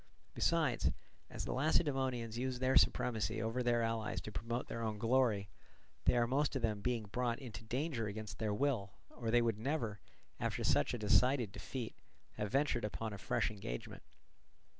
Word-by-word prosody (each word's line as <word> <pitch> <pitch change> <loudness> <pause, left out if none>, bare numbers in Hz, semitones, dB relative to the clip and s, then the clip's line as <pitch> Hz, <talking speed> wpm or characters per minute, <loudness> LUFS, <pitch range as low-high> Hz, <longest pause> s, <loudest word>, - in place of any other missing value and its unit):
Besides, 160 -8 +2 0.4
as - - -5
the - - -2
Lacedaemonians 130 -5 +1
use 130 +1 -1
their 130 +1 +2
supremacy 110 -2 +3
over 115 +3 -1
their 120 -1 +2
allies 110 -4 -1
to 110 - -7
promote 115 +3 -3
their 115 - -4
own 110 -2 -1
glory, 115 -3 +2 0.6
they - - +5
are 120 - +4
most 140 +4 +1
of 130 - -1
them 105 -3 0
being 120 0 0
brought 120 +3 -1
into 115 -6 -8
danger 125 0 -1
against 105 -2 -6
their 110 -2 0
will, 105 -4 0 0.2
or 115 -2 -4
they 120 +1 +5
would 115 -3 0
never, 115 -5 -1 0.4
after - - -1
such 75 - +3
a - - -3
decided 120 +1 +3
defeat, 120 +2 -5 0.4
have 105 - -3
ventured 135 -2 +2
upon 110 +1 -3
a 100 - -7
fresh 105 - 0
engagement. 80 - -6
115 Hz, 170 wpm, -36 LUFS, 110-130 Hz, 0.6 s, they